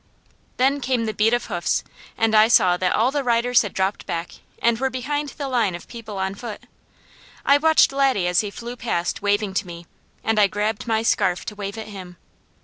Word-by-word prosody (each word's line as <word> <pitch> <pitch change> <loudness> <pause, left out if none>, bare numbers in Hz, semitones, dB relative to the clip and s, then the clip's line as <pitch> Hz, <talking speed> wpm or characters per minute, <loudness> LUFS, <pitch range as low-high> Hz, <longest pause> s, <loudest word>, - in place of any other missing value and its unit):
Then 275 +3 +2
came 245 -2 0
the 215 - -2
beat 215 +2 +2
of 240 0 0
hoofs - - -1 0.3
and 225 -1 +2
I 215 0 +6
saw 185 -6 +5
that 180 0 0
all 235 +4 +2
the 285 -1 -1
riders 240 0 +3
had 205 - -4
dropped 190 +2 -2
back, 170 +1 -3 0.3
and 235 -1 +2
were 265 +1 +1
behind 290 +3 -3
the 280 0 -6
line 230 -8 +1
of 175 - -10
people 220 -4 -8
on 190 0 -2
foot. 215 +1 -8 0.8
I 280 +1 +5
watched 315 -1 +4
Laddie 270 -9 +2
as 180 0 +2
he 210 - -4
flew 235 +4 -7
past 200 -8 -2
waving 205 0 0
to 190 - -1
me, 170 0 -9 0.4
and 220 -1 +1
I 205 - +6
grabbed 210 +3 -2
my 220 -1 +1
scarf 180 -5 +1
to 210 - -6
wave 200 +1 -6
at 220 -1 -7
him. 185 -3 -10
220 Hz, 210 wpm, -22 LUFS, 195-245 Hz, 0.8 s, I